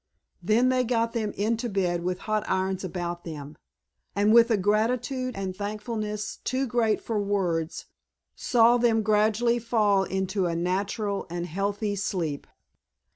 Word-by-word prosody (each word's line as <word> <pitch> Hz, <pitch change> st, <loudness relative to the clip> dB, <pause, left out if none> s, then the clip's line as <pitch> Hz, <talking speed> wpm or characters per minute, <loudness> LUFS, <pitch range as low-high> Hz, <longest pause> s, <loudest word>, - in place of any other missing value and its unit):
Then 220 Hz, +7 st, +3 dB
they 255 Hz, 0 st, +2 dB
got 230 Hz, -1 st, 0 dB
them 220 Hz, -3 st, -1 dB
into 230 Hz, +3 st, -1 dB
bed 180 Hz, -4 st, 0 dB
with 180 Hz, 0 st, -2 dB
hot 215 Hz, -1 st, -1 dB
irons 190 Hz, 0 st, 0 dB
about 175 Hz, -1 st, -4 dB
them, 150 Hz, -2 st, -8 dB, 0.6 s
and 205 Hz, +2 st, +3 dB
with 235 Hz, 0 st, +7 dB
a 225 Hz, -, +3 dB
gratitude 240 Hz, +6 st, 0 dB
and 190 Hz, -2 st, -4 dB
thankfulness 210 Hz, +1 st, -4 dB
too 265 Hz, +1 st, -1 dB
great 230 Hz, -3 st, +1 dB
for 225 Hz, -2 st, -2 dB
words 185 Hz, -5 st, -1 dB, 0.5 s
saw 235 Hz, 0 st, +4 dB
them 230 Hz, -2 st, +2 dB
gradually 220 Hz, +3 st, +2 dB
fall 210 Hz, -4 st, +2 dB
into 190 Hz, 0 st, -1 dB
a 170 Hz, -, -2 dB
natural 195 Hz, +4 st, -1 dB
and 175 Hz, 0 st, -3 dB
healthy 200 Hz, +4 st, -2 dB
sleep. 170 Hz, -7 st, -3 dB
205 Hz, 140 wpm, -26 LUFS, 185-230 Hz, 0.6 s, with